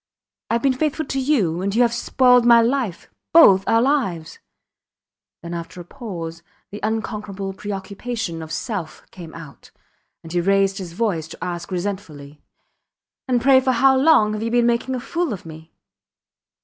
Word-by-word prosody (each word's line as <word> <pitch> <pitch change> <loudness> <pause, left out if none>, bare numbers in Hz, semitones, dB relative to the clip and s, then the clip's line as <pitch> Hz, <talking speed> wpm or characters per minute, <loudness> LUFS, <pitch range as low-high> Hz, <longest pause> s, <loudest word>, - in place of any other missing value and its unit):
Ive 230 0 0
been 270 -1 +3
faithful 305 +3 -2
to 270 0 -3
you 215 - +1
and 200 +2 -2
you 245 - +5
have 235 -1 +1
spoiled 250 +1 +3
my 235 0 +7
life 230 -5 -1 0.3
both 195 - +7
our 230 +1 +3
lives... 235 - -1 1.0
Then 170 0 -6
after 170 +1 -7
a 175 - -9
pause 170 -8 -7 0.3
the 205 - -7
unconquerable 210 -3 -4
preoccupation 200 -1 -5
of 160 0 -9
self 180 -3 -5
came 170 -3 -11
out, 160 -4 -12 0.5
and 165 - -10
he 175 0 0
raised 195 +1 +1
his 175 -3 -7
voice 180 -6 -1
to 165 - -10
ask 175 -1 -5
resentfully, 175 -7 -6 0.9
And, 250 -2 +2
pray, 265 0 +6
for 260 0 +1
how 265 +2 +4
long 260 -6 +4
have 215 - -4
you 230 - -2
been 240 0 +2
making 240 +2 0
a - - -3
fool 335 +1 -2
of 190 - -9
me? 160 0 -12
205 Hz, 165 wpm, -21 LUFS, 175-245 Hz, 1.0 s, my